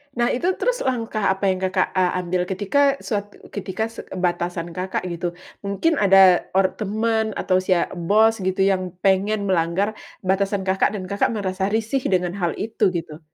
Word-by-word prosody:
Nah, 240 0 +2
itu 255 +8 -1
terus - - 0
langkah 230 -4 -2
apa 190 - -12
yang 185 - -2
Kakak 185 0 0
a 185 -1 +2
ambil 180 0 -1
ketika 270 +10 +2
suat 205 -3 -2 0.3
ketika 205 +1 -3
se 230 - -8
batasan 175 -1 -2
Kakak 185 +2 -3
gitu 175 0 -4 0.3
mungkin 280 +11 +1
ada 195 -3 +6
or 190 -1 +3
teman 220 +1 0
atau 185 - +1
sia 185 -2 +1
bos 215 +6 +2
gitu 190 0 -1
yang 185 -2 0
pengen 200 +2 +2
melanggar 175 +3 +1 0.3
batasan 195 +1 0
Kakak 190 +2 +1
dan 195 - -4
Kakak 200 0 +1
merasa 190 -2 -2
risih 225 +4 0
dengan 180 -2 0
hal 175 -2 -1
itu 220 -1 0
gitu? 160 -3 -5
190 Hz, 165 wpm, -22 LUFS, 185-215 Hz, 0.3 s, ada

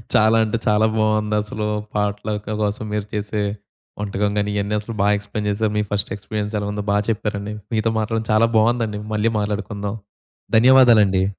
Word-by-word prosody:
చాలా 110 +1 +5
అంటే 110 +1 -1
చాలా 105 +1 +4
బావుందసలు. 105 0 0 0.3
పాట్‌లక్ 105 0 -2 0.2
కోసం 105 +1 -2
మీరు 105 -1 -2
చేసే 105 0 -2 0.6
వంటకం 100 0 -1
గానీ, 105 0 0
ఇవన్నీ 100 +1 -1
అసలు 115 +2 -7
బాగా 105 +1 +4
ఎక్స్‌ప్లెయిన్ 105 +1 -4
చేశారు. 105 +1 0
మీ 105 - +2
ఫస్ట్ 100 -1 -1
ఎక్స్‌పీరియన్స్ 105 +1 -4
ఎలా 100 - -3
ఉందో 105 0 -4
బాగా 105 +1 +2
చెప్పారండి. 105 -1 -2 0.2
మీతో 110 +1 +1
మాట్లాడడం 110 +1 -1
చాలా 110 +2 +4
బావుందండి. 110 -1 +1 0.2
మళ్లీ 110 +2 +1
మాట్లాడుకుందాం. 105 0 -3 0.6
ధన్యవాదాలండి. 115 -6 +6
105 Hz, 155 wpm, -21 LUFS, 105-110 Hz, 0.6 s, ధన్యవాదాలండి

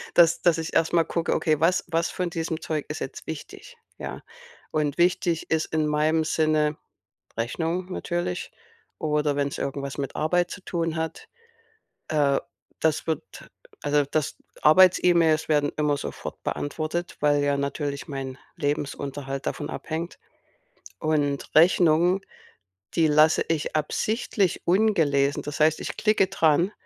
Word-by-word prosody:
dass 170 -1 +5
dass 170 -2 +3
ich 160 0 -4
erst 165 - +2
mal 165 -1 +4
gucke: 170 -1 -1
„Okay, 155 -3 +1
was 175 +3 +3
was 165 0 0
von 180 -1 -2
diesem 165 -1 -3
Zeug 155 -3 -3
ist - - -4
jetzt - - -7
wichtig?“, - - -8 0.2
ja? - - -6 0.5
Und 150 -2 0
wichtig 175 -1 +1
ist 160 -1 +2
in 155 -1 +2
meinem 155 +2 +2
Sinne, 155 -1 +1 0.6
Rechnungen 165 +10 -2
natürlich, 175 - -3 0.5
oder 150 -2 0
wenn's 140 -1 -1
irgendwas 140 0 -4
mit 140 -1 -4
Arbeit 175 +3 +1
zu 200 - -8
tun 165 -2 -2
hat, 160 - -4 0.8
äh, 145 -3 +2 0.4
das 160 0 +1
wird 160 -3 -5 0.3
also, 145 0 +2
dass 150 0 -1 0.3
Arbeits-E-Mails 170 -1 +5
werden 145 -2 +2
immer 150 -1 +1
sofort 140 - -7
beantwortet, 155 +4 -3
weil 145 -1 +3
ja 145 0 +2
natürlich 140 +1 -3
mein 135 -2 -5 0.2
Lebensunterhalt 140 -2 -3
davon 145 - -3
abhängt. 165 +2 -5 0.8
Und 145 -3 0
Rechnungen, 175 +2 +5 0.8
die 165 - +4
lasse 155 +1 +4
ich 160 -1 -1
absichtlich 200 - 0
ungelesen. 165 -8 +2
Das 145 +1 -5
heißt, 155 0 +4
ich - - -5
klicke 215 -3 +3
dran, 170 0 +2
155 Hz, 135 wpm, -25 LUFS, 145-170 Hz, 0.8 s, dass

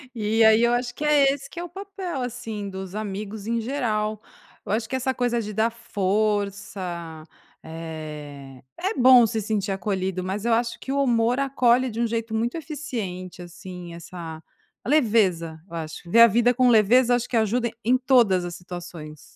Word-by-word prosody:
E 220 +1 +2
aí, 220 +1 +6
eu 240 0 +4
acho 245 0 -2
que 300 - -3
é 280 -2 +5
esse 280 0 -7
que 340 - -11
é 345 - -3
o 350 - -9
papel, 380 -5 -6
assim, 220 -4 -5
dos 190 -1 -7
amigos 210 0 -5
em 230 0 0
geral. 215 -5 -1 0.4
Eu - - -4
acho 225 +1 0
que 260 - -6
essa 260 0 0
coisa 240 -1 0
de 210 -1 -6
dar 225 +2 +2
força, 200 -6 -2 0.4
eh, 150 -5 -8
é 385 +4 -1
bom 250 -2 +7
se 220 -1 -2
sentir 205 -1 -1
acolhido, 190 -1 -2
mas 195 +3 -4
eu 235 - +2
acho 235 +1 0
que 270 - -5
o 280 - +2
humor 240 0 +2
acolhe 255 -2 +3
de 220 - -7
um 235 - +2
jeito 225 0 -3
muito 235 +7 -1
eficiente, 230 - -6
assim, 175 0 -9
essa 170 -2 -8 0.4
a - - -7
leveza 205 - +2
eu 170 - -7
acho, 160 +2 -7
ver 230 - +5
a 235 - +11
vida 235 +3 +3
com 250 0 +3
leveza 240 +3 +5
acho 245 0 -1
que 240 - -1
ajuda 230 +2 +1
em 250 +3 +4
todas 240 -8 +3
as 175 -1 -5
situações. 170 -4 -9
220 Hz, 185 wpm, -24 LUFS, 185-245 Hz, 0.4 s, a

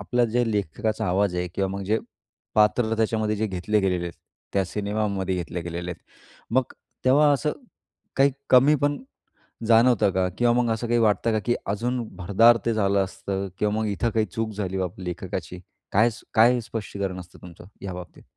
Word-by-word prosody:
आपलं 120 +4 +1
जे 120 -2 +2
लेखकाचा 105 +2 -1
आवाज 95 +1 +1
आहे 90 0 -1
किंवा 95 0 0
मग 100 0 -4
जे 110 +3 +1 0.6
पात्र 110 +1 +3
त्याच्यामध्ये 110 -1 0
जे 110 +2 0
घेतले 100 +2 0
गेलेले 90 -3 0
आहेत, 85 - -5 0.4
त्या 100 -1 +2
सिनेमामध्ये 100 0 -2
घेतले 90 0 -4
गेलेले 85 +1 -5
आहेत. 85 - -9 0.5
मग 130 -1 +1 0.3
तेव्हा 145 +3 +5
असं 145 +2 0 0.6
काही 140 +1 +4 0.2
कमी 135 +4 +6
पण, 145 - -1 0.7
जाणवतं 115 -2 +5
का? 95 -1 +1
किंवा 120 -1 +3
मग 120 -2 0
असं 110 +2 -3
काही 120 0 +2
वाटतं 115 +1 +2
का, 110 - +1
की 120 - +2
अजून 120 +5 -1 0.2
भरदार 115 +6 +5
ते 115 - +2
झालं 100 -2 +2
असतं 95 +1 -4
किंवा 105 0 +1
मग 110 0 0
इथं 105 +3 0
काही 110 0 +1
चूक 110 +3 -3
झाली 95 -2 -3
बाप 90 -1 -3
लेखकाची. 90 -1 -5 0.3
काय 110 +4 +4 0.2
काय 120 +3 +5
स्पष्टीकरण 100 -4 -4
असतं 90 0 -13
तुमचं 85 -2 -12 0.2
ह्या 95 -2 -5
बाबतीत? 90 -1 -10
105 Hz, 175 wpm, -25 LUFS, 95-115 Hz, 0.7 s, कमी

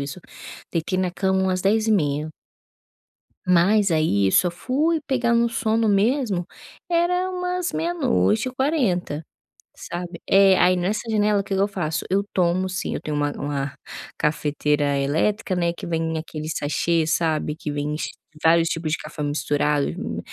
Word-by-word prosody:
isso, 140 +6 -5 0.5
deitei 175 +2 -1
na 185 -1 0
cama 190 -1 +1
umas 185 -1 0
22h30 195 -8 +1 1.2
mas 190 +3 +4
aí 155 -12 +2
eu - - +1
só 180 - +4
fui 300 - 0
pegar 245 -4 +1
no 235 0 +3
sono 225 -1 +1
mesmo 210 -2 +1 0.4
era 355 +2 +1
umas 360 -1 -2
00h40, 255 - 0 0.5
sabe. 175 0 -7
É, 195 -1 +6
aí 180 +1 +4
nessa 205 +6 -2
janela, 210 -1 +2
o - - -8
que 195 -1 -3
que - - 0
eu 200 - +3
faço? 175 -6 -3
Eu 195 +2 +2
tomo, 185 +1 +1
sim 185 - -3
eu - - -4
tenho 150 -1 -3
uma 145 0 0
uma 140 -1 -3 0.4
cafeteira 150 -1 0
elétrica, 175 +9 0
né, 170 -1 0
que - - -8
vem 165 -1 -1
aquele 155 -1 -6
sachê, 160 +2 0
sabe, 155 -2 0
que 150 - -5
vem 145 +1 -2
ch - - -3 0.3
vários 165 0 +4
tipos 165 -2 -2
de 165 - +1
café 150 - -6
misturado, 145 0 0
hum, - - -4
180 Hz, 155 wpm, -23 LUFS, 155-215 Hz, 1.2 s, É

